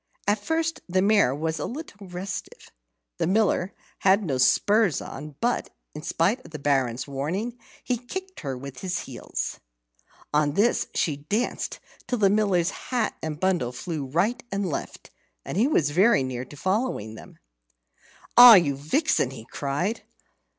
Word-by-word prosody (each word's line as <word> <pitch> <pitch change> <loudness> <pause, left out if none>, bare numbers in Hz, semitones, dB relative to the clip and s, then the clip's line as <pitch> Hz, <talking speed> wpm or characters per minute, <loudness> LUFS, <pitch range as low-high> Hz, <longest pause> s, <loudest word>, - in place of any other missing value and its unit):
At 205 +1 +2
first 325 +4 -1
the 185 +1 +2
mare 200 -11 +4
was 160 +1 -2
a - - -2
little 235 -8 -8
restive. 180 +2 -7 0.5
The - - +1
Miller 195 -1 +2 0.3
had 195 +2 +4
no 135 -8 -1
spurs 205 - +3
on, 150 +1 -8
but, 240 +1 0 0.2
in 150 - -7
spite 185 +10 0
of - - -13
the 155 - -7
Baron's 135 -4 0
warning, 180 - -3 0.2
he 250 - 0
kicked 375 +10 -7
her 135 -4 -4
with 135 0 -9
his 185 -2 -2
heels. - - -5 0.7
On 150 -1 +2
this, 215 +8 +2
she 150 -4 0
danced 205 +12 -2 0.3
till 245 - -1
the 200 -3 +4
Miller's 200 -4 +2 0.2
hat 245 -3 0
and 155 -1 -4
bundle 175 -10 +1
flew 150 +3 -4
right 200 - 0
and 195 -1 -1
left, 155 - -6 0.3
and - - -5
he 220 +7 +3
was 155 - +2
very 190 - +4
near 130 -1 -4
to 145 - -13
following 190 - -1
them. 110 - -13 1.0
"Ah, 245 -2 +12
you 155 -7 +3
vixen!" 155 - +1
he 125 -4 -10
cried. 145 - -2
180 Hz, 155 wpm, -25 LUFS, 145-215 Hz, 1.0 s, Ah